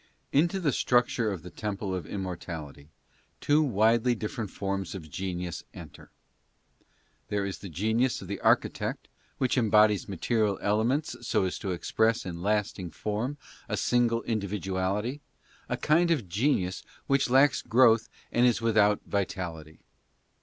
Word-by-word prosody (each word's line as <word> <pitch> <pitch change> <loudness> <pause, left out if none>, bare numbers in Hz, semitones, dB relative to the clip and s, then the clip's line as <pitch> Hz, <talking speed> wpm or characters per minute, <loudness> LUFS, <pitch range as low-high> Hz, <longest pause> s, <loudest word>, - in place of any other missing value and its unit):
Into 170 +7 +2
the 160 -6 +1
structure 120 -3 +2
of 90 -5 -6
the 90 - -9
temple 100 -2 -4
of 90 -5 -4
immortality 85 -6 -6 0.5
two 150 +1 +3
widely 115 -1 +3
different 110 -1 -4
forms 95 0 -3
of 80 -5 -9
genius 90 0 -4
enter. - - -11 1.2
There 100 -1 -1
is 95 - -5
the 100 - -8
genius 110 - 0
of 95 - -9
the 100 - -4
architect, - - +1 0.3
which 130 0 +1
embodies 105 -3 +4
material 105 +1 0
elements 115 +9 0
so - - +2
as 90 - -3
to 100 - -4
express 110 +5 +1
in 85 -2 -6
lasting 100 -2 -1
form 110 - -3 0.3
a - - -1
single 120 -1 +2
individuality 100 - -2 0.2
— - - -29
a - - -1
kind 170 +3 +3
of 145 - +1
genius 95 - 0 0.2
which 140 -2 +2
lacks 135 +3 +4
growth 115 -1 +4 0.2
and 120 +1 +4
is 120 - +2
without 110 -3 +3
vitality. 85 -6 -4
105 Hz, 140 wpm, -28 LUFS, 95-120 Hz, 1.2 s, embodies